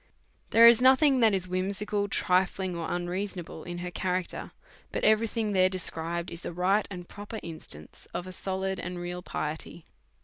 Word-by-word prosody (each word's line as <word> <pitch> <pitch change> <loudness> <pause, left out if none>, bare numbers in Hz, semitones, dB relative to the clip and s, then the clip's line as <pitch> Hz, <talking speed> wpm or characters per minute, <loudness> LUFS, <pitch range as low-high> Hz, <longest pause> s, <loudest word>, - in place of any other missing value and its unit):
There 230 +1 +8
is 235 0 +7
nothing 265 +1 +6
that 225 -2 +5
is 185 -1 +1
whimsical, 200 +3 -1
trifling, 185 -1 +1
or 170 -1 -3
un 175 0 -1
reasonable 180 -3 -4
in 175 0 -6
her 180 - -4
character, 180 0 -2 0.4
but - - -3
every 220 +1 +4
thing 220 -1 -2
there 185 -1 +5
is - - -2
described 170 -2 -3
in 170 - -3
a - - -4
right 185 +4 +2
and 180 -3 -7
proper 205 +2 -7
instance 120 - -9
of 175 - -4
a 185 - -7
solid 190 0 -3
and 180 0 -5
real 175 0 -5
piety. 160 0 -5
185 Hz, 180 wpm, -28 LUFS, 175-205 Hz, 0.4 s, There